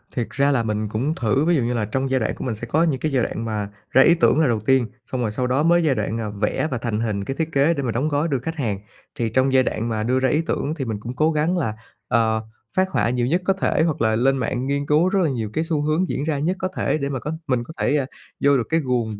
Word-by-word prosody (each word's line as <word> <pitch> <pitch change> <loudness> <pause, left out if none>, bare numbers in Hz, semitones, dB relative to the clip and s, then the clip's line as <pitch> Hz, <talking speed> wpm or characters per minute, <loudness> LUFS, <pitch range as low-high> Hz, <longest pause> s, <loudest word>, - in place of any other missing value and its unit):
Thiệt 120 -3 -2
ra 140 +1 +2
là 125 -4 +1
mình 105 -1 -1
cũng 130 +9 -1
thử, 130 +4 +1
ví 175 +1 +3
dụ 140 - +2
như 120 +1 0
là 115 -3 0
trong 130 +5 -2
giai 130 - +3
đoạn 110 - -1
của - - -6
mình 120 -4 -2
sẽ 120 +3 -5
có 155 +8 +2
những 150 -6 +1
cái 155 - -1
giai 130 -3 +2
đoạn 115 - -3
mà 105 -2 -3 0.2
ra 130 - +6
ý 170 - +6
tưởng 165 -2 +3
là 160 - +4
đầu 115 -3 +1
tiên, 130 +2 +2 0.2
xong 130 0 -3
rồi 110 -3 -1
sau 125 +4 -1
đó 130 +4 +1
mới 170 +1 +4
giai 145 -4 +2
đoạn, 105 0 -2
à, 110 - -3
vẽ 105 +8 -1
và 130 - -1
thành 115 -3 -2
hình 105 -3 -1
cái 135 - -4
thiết 160 0 -1
kế 145 +3 +3
để 140 -4 -3
mà 120 - -1
đóng 125 +7 0
gói 150 +1 0
đưa 140 -5 0
khách 160 +7 -5
hàng. 110 - -2 0.4
Thì 120 -5 -1
trong 130 +4 +2
giai 130 -1 +5
đoạn 115 -1 -2
mà 110 -1 -1
đưa 125 +3 +1
ra 130 0 +2
ý 150 +5 +2
tưởng 150 - -1
thì 140 -5 -3
mình 110 -3 -3
cũng 120 +4 -7
cố 155 +4 +2
gắng 160 +4 +1
là, 115 -11 -1 0.3
ờ, 110 -1 +2 0.3
phác 185 0 +2
họa 115 - +1
nhiều 125 0 0
nhất 170 +7 +1
có 195 - +3
thể, 190 -4 +1
hoặc 160 -7 -1
là 110 -1 +3
lên 135 +4 +2
mạng 125 +1 -2
nghiên 140 +1 -1
cứu 155 +5 +3
rất 195 0 +1
là 160 - +2
nhiều 115 -5 -3
cái 160 - 0
xu 160 -3 -1
hướng 155 +5 0
diễn 140 - -2
ra 150 -2 -1
nhất 170 +6 0
có 185 - -1
thể - - 0
để 140 -2 -2
mà 135 -2 -3
có 150 - -4 0.2
mình 125 -3 +1
có 140 - -10
thể, 150 - +2
à, 140 - 0 0.4
vô 140 0 +5
được 120 - -2
cái 165 - +2
guồng 120 -7 -1
130 Hz, 315 wpm, -22 LUFS, 115-155 Hz, 0.4 s, ra